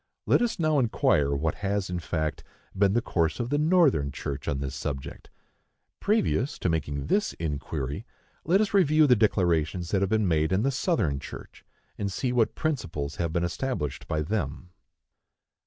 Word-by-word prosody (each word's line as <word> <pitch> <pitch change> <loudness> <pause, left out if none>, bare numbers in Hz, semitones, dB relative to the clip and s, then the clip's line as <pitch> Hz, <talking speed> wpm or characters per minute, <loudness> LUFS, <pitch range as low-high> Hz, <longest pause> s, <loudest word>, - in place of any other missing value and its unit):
Let - - +4
us 240 -2 0
now 155 -4 +2
inquire 75 - +2
what 75 +3 0
has, 100 -1 -1
in 90 -1 -3
fact, 80 -2 -3 0.3
been 100 0 +3
the 120 +1 +1
course 85 +3 0
of 120 +1 -2
the 145 - +2
Northern 150 - +3
church 70 0 -5
on 70 - 0
this 70 -1 -4
subject. 65 -2 -5 0.7
Previous 205 - +1
to 90 - -1
making 70 -3 -2
this 210 - +1
inquiry, 75 - -4 0.4
let 185 +6 +3
us 210 - -1
review 155 -5 +5
the 125 -4 +6
declarations 85 -5 +1
that 100 - +2
have 100 - +1
been 110 -2 +2
made 80 -2 +1
in 95 +3 +2
the 135 - +2
Southern 125 - 0
church, - - -10 0.4
and 100 -1 -2
see 125 +5 -1
what 120 -3 +2
principles 80 - -3
have 85 -2 -1
been 85 +1 0
established 85 - -3
by 75 -1 -1
them. 85 -2 -3
95 Hz, 170 wpm, -27 LUFS, -, 0.7 s, the